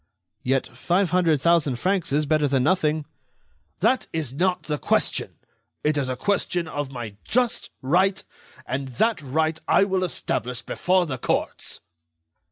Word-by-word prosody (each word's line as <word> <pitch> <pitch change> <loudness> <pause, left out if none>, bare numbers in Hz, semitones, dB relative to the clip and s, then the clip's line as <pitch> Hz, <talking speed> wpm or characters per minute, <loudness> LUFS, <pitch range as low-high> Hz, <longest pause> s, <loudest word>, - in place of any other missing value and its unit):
"Yet 135 +1 +1
five 180 0 0
hundred 165 -6 +3
thousand 165 -5 +3
francs 185 +6 0
is 150 +2 +2
better 150 0 +2
than 135 -2 +2
nothing." 155 -2 +1 0.8
"That 240 +6 +2
is 155 -6 -3
not 180 +5 0
the 150 -1 -2
question. - - 0 0.5
It 150 0 +2
is 140 -3 0
a 130 - -1
question 180 +1 0
of 145 -3 -4
my 115 -6 -7
just 245 0 0
right, 185 +7 +2 0.4
and 135 +1 -3
that 225 -6 +2
right 155 +3 0
I - - +5
will 190 -2 0
establish 125 -7 -2
before 185 0 +1
the 130 -6 -4
courts." - - -2
160 Hz, 150 wpm, -24 LUFS, 140-185 Hz, 0.8 s, I